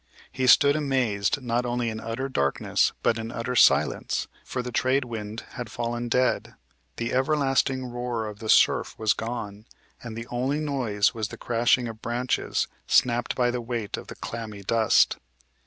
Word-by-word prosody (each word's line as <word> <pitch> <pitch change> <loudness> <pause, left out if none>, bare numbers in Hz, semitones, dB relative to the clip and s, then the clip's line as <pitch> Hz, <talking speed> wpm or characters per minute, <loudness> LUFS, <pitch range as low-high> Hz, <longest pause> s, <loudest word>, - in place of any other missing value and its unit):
He 130 -1 -1
stood 140 +2 +6
amazed 130 -5 0
not 120 0 0
only 120 -1 -1
in 110 - -5
utter 115 +4 -3
darkness, 70 - +1
but 115 - +2
in 115 +1 -5
utter 120 +1 -3
silence; 75 - +3 0.2
for 125 - -4
the 125 - -5
trade 130 +2 +1
wind 110 -2 -6
had 125 -4 -6
fallen 120 0 -3
dead, 125 +1 +1 0.4
the 115 0 -3
everlasting 135 -1 +1
roar 120 -2 -3
of 105 -1 -7
the 110 - -6
surf - - +4
was 110 -1 +2
gone, 110 -2 -6 0.3
and 115 -2 -7
the 115 - -5
only 130 +4 0
noise 125 -10 0
was 110 -3 -3
the - - -10
crashing 120 +1 +2
of 110 -1 -8
branches, 120 +2 -1 0.2
snapped 120 -1 +2
by 120 -1 +2
the 125 0 -3
weight 115 -3 -3
of - - -9
the - - -8
clammy 110 -3 -7
dust. 110 +2 +3
120 Hz, 170 wpm, -26 LUFS, 110-125 Hz, 0.4 s, stood